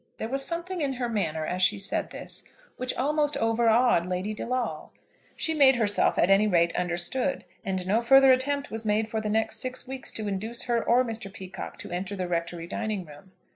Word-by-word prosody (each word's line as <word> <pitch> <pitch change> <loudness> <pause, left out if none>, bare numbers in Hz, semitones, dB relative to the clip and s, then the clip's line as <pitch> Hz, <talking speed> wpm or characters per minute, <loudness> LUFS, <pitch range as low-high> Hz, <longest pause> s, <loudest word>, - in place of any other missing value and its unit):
There 220 - -4
was 270 +2 0
something 345 +3 -3
in 275 -2 0
her 245 -1 -2
manner, 160 -9 -1
as 180 +3 -3
she 205 +3 +3
said 195 0 -2
this, - - -7 0.3
which 255 0 -2
almost 295 +2 +1
overawed 225 -4 +3
Lady 185 +4 -2
De 215 - -6
Lawle. 250 0 -2 0.5
She 320 - 0
made 275 -4 +6
herself, 210 -4 +2
at 180 - +3
any 200 +2 +5
rate, 170 -3 +2
understood, 180 +10 -1 0.2
and 190 -3 -2
no 210 +5 +2
further 270 +2 +7
attempt 280 +2 +1
was 225 0 -4
made 215 0 +1
for 220 0 -2
the 215 - -3
next 220 +1 0
six 255 +2 -3
weeks 265 0 -5
to 215 -1 -2
induce 215 +4 -2
her 235 -2 0
or 250 +2 +3
Mr. 225 -4 -6
Peacocke 190 -2 -8
to - - -8
enter 190 +3 -3
the 185 -2 -3
Rectory 170 0 -3
dining 215 0 -3
room. 155 +5 -15
220 Hz, 205 wpm, -27 LUFS, 190-255 Hz, 0.5 s, further